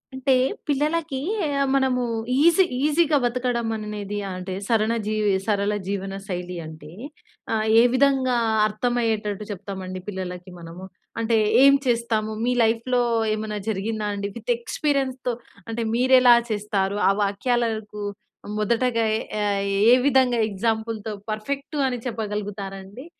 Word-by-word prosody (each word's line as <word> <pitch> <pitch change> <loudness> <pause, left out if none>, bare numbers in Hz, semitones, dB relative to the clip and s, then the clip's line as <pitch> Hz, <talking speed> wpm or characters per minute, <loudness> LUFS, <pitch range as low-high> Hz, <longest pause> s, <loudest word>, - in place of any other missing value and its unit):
అంటే, 265 0 +2 0.3
పిల్లలకి 300 0 0 0.3
ఆహ్, 280 -2 0
మనము 265 -2 +2 0.4
ఈజీ 340 +5 +6 0.2
ఈజీగా 305 0 +3
బతకడం 240 -1 -1
అనేది 210 -1 -5
అంటే, 185 0 -5
సరన 225 -1 +2
జీవి 215 -1 +1
సరళ 205 -1 +1
జీవన 195 0 -3
శైలి 180 -2 -4
అంటే 155 -1 -10 0.6
ఆహ్, 220 -1 0
ఏ - - +5
విధంగా 260 -1 +3 0.3
అర్థమయ్యేటట్టు 215 -2 -1
చెప్తామండి 190 -1 -6
పిల్లలకి 185 -2 -6
మనము? 170 +2 -9 0.3
అంటే, 230 0 +2 0.3
ఏం 275 0 +8
చేస్తాము? 230 -3 0
మీ 250 - +2
లైఫ్‌లో, 230 +2 +1 0.3
ఏమన్నా 215 -1 -4
జరిగిందా 215 +1 -2
అండి? 200 0 -3
విత్ 235 +1 -3
ఎక్స్‌పీరియన్స్‌తో 260 0 -1 0.3
అంటే 225 +1 -3
మీరెలా 250 0 +6 0.2
చేస్తారు? 205 -1 -1
ఆ - - +5
వాక్యాలకు 220 0 -1 0.6
మొదటగా 230 +2 +1
ఎ - - -4 0.2
ఆహ్, 200 -1 0 0.3
ఏ - - +9
విధంగా 260 -3 +3
ఎగ్జాంపుల్‌తో, 220 +1 -2 0.2
పర్ఫెక్టూ 280 +8 -4
అని 250 -2 -2
చెప్పగలుగుతారండి? 205 0 -5
225 Hz, 120 wpm, -23 LUFS, 205-250 Hz, 0.6 s, ఏ